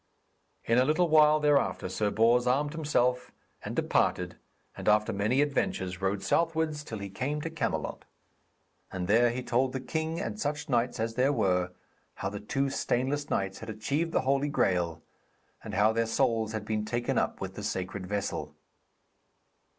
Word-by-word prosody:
In 115 +2 +3
a - - +5
little 155 +5 +2
while 155 0 +6
thereafter 145 -8 +2
Sir 105 +3 0
Bors 115 +3 +3
armed 145 +4 +1
himself, 125 -6 0 0.3
and - - -5
departed, - - +1 0.4
and - - -7
after 105 0 +3
many 110 +7 +2
adventures, 95 -10 -2
rode 95 +1 -1
southwards 160 +5 0
till 110 - -6
he 100 -1 -5
came 130 +10 -3
to 165 - -4
Camelot. 160 - -3 0.9
And 90 -1 -3
there 120 +4 +5
he 125 +2 -3
told 125 +2 +1
the 130 - -2
king 160 +4 -3
and 210 +2 -4
such 150 -5 -2
knights 120 -1 +1
as 115 0 -1
there 130 +4 +2
were, 90 -7 +1 0.4
how 95 - -3
the 100 0 -6
two 135 +6 -1
stainless 135 +2 -1
knights 95 -1 -1
had - - -8
achieved 140 +10 -1
the - - +2
Holy 140 +2 +1
Graal, 85 - 0 0.6
and - - -6
how 110 +2 +4
their 115 0 +1
souls 115 -1 +1
had 110 -1 -4
been 110 -1 -1
taken 120 +2 0
up - - -2
with - - -5
the - - -7
sacred 95 0 -4
vessel. 100 0 -3
120 Hz, 170 wpm, -29 LUFS, 105-145 Hz, 0.9 s, while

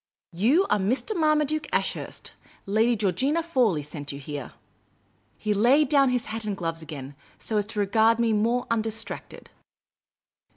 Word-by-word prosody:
You 250 - +3
are 210 - +3
Mr, 245 - 0
Marmaduke 305 -2 +1
Ashurst. - - -2 0.3
Lady 220 +4 +2
Georgina 255 - 0
Fawley 245 - +1
sent 145 0 -6
you 140 - -7
here. 145 -1 -7 0.3
' - - -40
' - - -40
He 210 -1 -1
laid 255 +8 +4
down 275 -3 +4
his 250 -1 0
hat 225 +1 -5
and 205 -2 -3
gloves 165 -2 -3
again, 145 -3 -8 0.2
so 220 - -2
as 205 -1 0
to 220 -1 -4
regard 220 +3 +3
me 230 -1 +2
more 230 +4 +1
undistracted. 225 0 -3
220 Hz, 160 wpm, -26 LUFS, 190-255 Hz, 0.3 s, laid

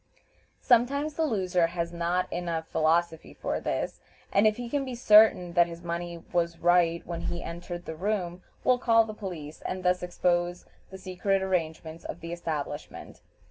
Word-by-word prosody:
Sometimes 280 +5 +3
the 320 +1 0
loser 185 - +1
has 170 0 -3
not 175 +2 -1
enough 170 -2 -2
philosophy 160 +1 0
for - - -2
this, - - -3 0.3
and 205 +2 +5
if 215 - +1
he 245 -1 -5
can 280 +3 -1
be 260 -2 -5
certain 210 -6 +6
that 175 -1 +5
his 170 0 -9
money 170 0 -4
was 170 -1 +1
right 170 -1 +3
when 170 -1 -5
he 175 -1 -3
entered 175 +1 -6
the 160 - -5
room, 185 -1 -2 0.2
will 250 -1 +3
call 230 -2 +5
in 225 - -1
the - - -4
police, 175 -8 -7
and 185 0 -4
thus 180 0 +2
expose 175 0 0 0.2
the 190 - -9
secret 190 +1 -1
arrangements 165 -3 -2
of 170 - -7
the 165 +1 -5
establishment. 150 -4 -5
175 Hz, 175 wpm, -28 LUFS, 170-200 Hz, 0.3 s, certain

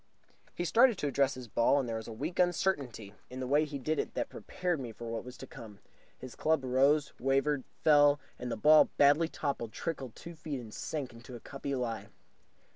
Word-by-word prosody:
He 175 - -2
started 230 +6 +5
to 145 - -1
address 140 0 +1
his 130 -2 -8
ball, 120 +6 +3
and 130 - -2
there 115 -1 -2
was 110 - -7
a - - -6
weak 150 +12 -5
uncertainty 145 - 0 0.2
in 130 - -7
the 130 - -3
way 145 +4 +3
he 145 -1 -5
did 155 +4 -1
it - - -3
that - - -2
prepared 180 -3 -3
me 125 -4 -5
for 115 +2 -9
what 115 - -3
was 125 +1 -10
to - - -8
come. 105 -3 -11 0.4
His 130 -1 -9
club 155 -3 +1
rose, 140 +3 +3
wavered, 135 +1 +1 0.2
fell; 145 -2 +6 0.2
and 125 0 -4
the - - -2
ball, 155 +7 +6
badly 145 +3 +5
topped, 140 -8 -3
trickled 135 -6 -5
two 170 - -9
feet 155 -4 -5
and 110 -3 -10
sank 140 -6 -4
into 115 +2 -11
a - - -8
cuppy 140 +2 -5
lie. 115 -3 -3
140 Hz, 210 wpm, -31 LUFS, 125-155 Hz, 0.4 s, fell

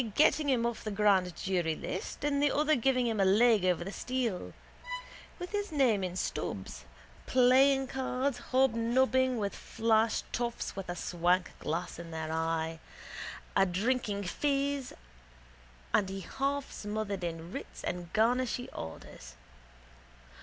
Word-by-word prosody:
getting 305 -1 +4
him 240 -3 +2
off 235 -1 -2
the 215 - -3
grand 195 -4 +3
jury 175 -5 0
list 185 - -5
and 285 -1 +1
the 290 -1 +4
other 305 +1 +3
give 265 +1 +2
him 235 -4 +1
a - - +5
leg 210 +2 +5
over 180 -2 +2
the 195 - -5
stile. 245 -6 -2 0.9
With 355 0 -6
his 410 -2 -2
name 250 -10 +3
in 180 -1 -3
Stubbs's. 95 - -4 0.4
Playing 265 +2 +5
cards, 260 0 -1
hobnobbing 260 +1 +3
with 200 -2 -2
flash 225 0 +1
toffs 235 0 -2
with 195 -2 -6
a 175 - -2
swank 175 +1 +1
glass 165 +2 -3
in 170 -1 -8
their 160 -1 -4
eye, 160 0 -1 0.8
adrinking 200 +3 +1
fizz 280 +3 -1 1.0
and 195 - +3
he 195 0 -5
half 275 +8 -2
smothered 205 -2 -3
in 165 0 -4
writs - - -7
and 175 -1 -4
garnishee 245 +3 +1
orders. 60 -6 -8
220 Hz, 135 wpm, -31 LUFS, 180-260 Hz, 1.0 s, a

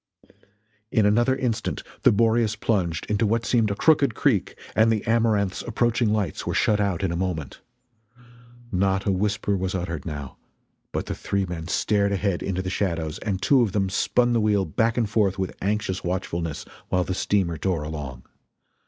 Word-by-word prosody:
In 110 - +3
another 120 +5 +3
instant 125 -4 -2 0.2
the - - +6
Boreas 115 0 +2
plunged 95 -6 -1
into 105 +1 +1
what 115 +2 0
seemed 115 -1 +2
a 100 - -1
crooked 145 +3 +3
creek, 120 -10 +1 0.2
and 110 +1 +4
the 110 -2 -1
Amaranth's 110 -4 +1
approaching 120 -2 +1
lights 105 -7 -1
were - - -1
shut 105 -1 +2
out 100 -2 0
in 95 - 0
a - - -2
moment. 85 -6 -3 1.1
Not 95 +1 +1
a 100 - +2
whisper 100 +1 0
was 95 +1 -2
uttered, 85 -4 -3
now, 75 -4 -6 0.5
but - - -2
the - - -3
three 100 -1 -1
men 85 -2 -6
stared 100 +2 +1
ahead 100 -2 0
into 95 -1 -2
the 90 - -3
shadows 85 -6 -2
and 100 -3 -2
two 135 -3 +5
of 110 -5 0
them 95 -2 0
spun 120 +5 +2
the 115 - +2
wheel 105 -2 +2
back 115 +9 0
and 115 -3 +2
forth 100 -2 +1
with 95 -1 -3
anxious 100 -2 -1
watchfulness 85 -3 -3 0.2
while 90 -1 +2
the 95 - -3
steamer 90 -3 0
tore 85 -4 -1
along. 75 -5 -6
100 Hz, 180 wpm, -24 LUFS, 90-110 Hz, 1.1 s, the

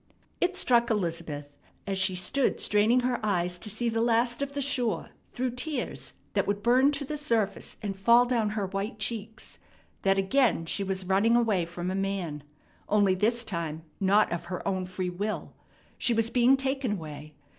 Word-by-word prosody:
It 365 +1 0
struck 235 -6 +3
Elizabeth, 165 -8 -3 0.3
as 195 -1 -2
she 190 -1 +2
stood 215 +9 +1
straining 215 +4 +3
her 245 -2 -1
eyes 180 -3 0
to 215 - -5
see 220 +4 -2
the 225 0 0
last 235 +2 +2
of 280 0 -3
the 285 - -3
shore 245 -9 -1 0.2
through 255 0 -2
tears 250 +2 -3 0.2
that - - +1
would 205 0 -1
burn 255 +4 +5
to 280 0 -3
the 300 +2 -4
surface 225 -9 -1
and 200 -2 -3
fall 235 +5 +5
down 235 -4 +1
her 200 - 0
white 195 +4 -4
cheeks, 220 -1 -4 0.4
that 195 0 +2
again 210 -2 +2
she 195 - -2
was 190 -1 -2
running 200 +5 +3
away 215 -8 +2
from 175 +1 -4
a - - -2
man, 190 -6 -2 0.5
only 205 -2 +4
this 230 +5 +1
time 165 -6 -4 0.2
not 200 +2 +3
of 170 - -3
her 180 +1 -5
own 185 -1 -1
free 185 0 -3
will. 205 +4 -4 0.5
She 235 - +2
was 225 +1 +1
being 250 +2 +5
taken 265 -3 -1
away. 155 -4 -8
210 Hz, 180 wpm, -28 LUFS, 185-240 Hz, 0.5 s, burn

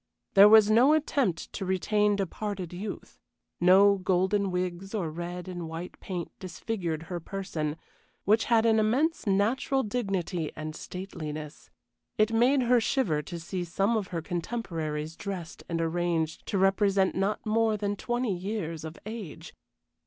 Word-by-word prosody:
There 200 +1 +9
was 215 -1 +7
no 250 +7 +6
attempt 280 - 0
to - - -4
retain 205 +3 +2
departed 195 -2 -4
youth; 195 +3 -7 0.4
no 195 +3 +6
golden 190 +2 +1
wigs 180 +2 -3
or 175 -7 -2
red 175 +2 -6
and 175 -3 -5
white 165 +2 -7
paint 180 -3 -5
disfigured 175 -3 -4
her 175 +1 -5
person, 165 -4 -4 0.5
which 215 +3 +3
had 230 -1 +3
an 225 -1 +4
immense 255 +7 +1
natural 230 +7 +2
dignity 195 -8 -2
and 155 0 -6
stateliness. 155 -5 -7 0.5
It 215 +1 +3
made 255 +4 +4
her 245 0 +4
shiver 210 - +1
to 170 +3 -7
see 180 +2 -4
some 195 +6 0
of 210 -4 -1
her 170 -3 -4
contemporaries 165 -5 -3
dressed 185 -5 -6
and 165 -1 -1
arranged 165 -1 -1
to 200 - -1
represent 195 0 +3
not 195 +3 -1
more 220 0 +2
than 205 0 -1
twenty 240 0 -1
years 175 -4 -4
of 160 +1 -7
age. 215 -7 -7
195 Hz, 145 wpm, -28 LUFS, 170-215 Hz, 0.5 s, There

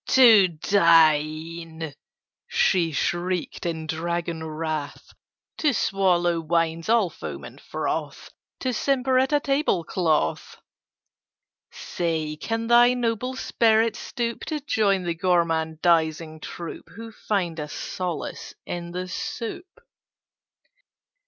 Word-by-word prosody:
"To 225 -7 +7
dine!" 160 -2 +2 0.5
she 170 -3 +2
shrieked 175 +4 -2
in 160 -2 -3
dragon 170 +1 -3
wrath. 155 -2 -5 0.5
"To 295 -3 +2
swallow 175 -4 +2
wines 165 +1 0
all 225 -6 +3
foam - - -7
and - - -11
froth! - - -4 0.3
To 255 -1 -1
simper 260 +1 +1
at 265 +2 +1
a 295 - +4
table 275 - +1
cloth! 160 -3 -1 1.1
"Say, 160 -3 -3
can 225 +8 -3
thy 240 +1 +5
noble 245 +1 -1
spirit 225 -3 +2
stoop 235 -1 -4
To 310 -2 -3
join 205 -9 +1
the 170 -1 -1
gormandising 165 -2 +1
troup 170 +1 -8
Who 225 +1 -8
find 185 -7 -2
a 150 - -4
solace 180 +3 -5
in 170 0 -5
the 180 +1 -4
soup? 355 - -6
175 Hz, 105 wpm, -24 LUFS, 160-225 Hz, 1.1 s, To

